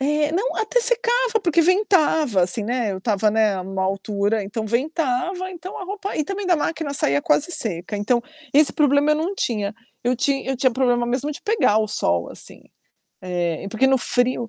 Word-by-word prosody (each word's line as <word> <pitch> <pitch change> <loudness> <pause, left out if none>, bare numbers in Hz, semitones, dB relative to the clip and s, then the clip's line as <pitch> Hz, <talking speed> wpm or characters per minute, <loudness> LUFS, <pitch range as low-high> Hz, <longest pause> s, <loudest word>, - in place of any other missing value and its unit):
É. 295 +2 +1
Não, 405 +9 -1
até 440 +3 +1
secava 480 -1 +2
porque 340 -2 +3
ventava, 320 - +2
assim, 185 +4 0
né. 235 -1 -1
Eu 190 - -5
estava, 210 +1 +1
né, 210 -3 +1
numa 190 +1 -4
altura, 200 +2 -1
então 215 +3 -4
ventava, 310 - -1
então 365 +1 -8
a 385 - -6
roupa 395 +1 -5
e 305 - 0
também 395 +3 -4
da 355 -2 +3
máquina 310 -1 -2
saía 145 - +1
quase 320 +4 +1
seca 195 - -1
então, 220 +4 +1 0.3
esse 295 +1 +4
problema 290 0 +3
eu - - +3
não 330 +6 -2
tinha. 210 - -2 0.3
Eu 250 +1 +1
tinha 275 +1 -1
eu 265 - -1
tinha 260 +1 +2
problema 245 -1 +1
mesmo 255 +4 -1
de 295 - -8
pegar 415 - +2
o 220 - +1
sol 85 - 0
assim. - - -11 0.6
É, 175 -3 -3
e - - -5
porque 225 +6 +1
no 265 0 +3
frio 245 -1 0
260 Hz, 195 wpm, -22 LUFS, 210-330 Hz, 0.6 s, esse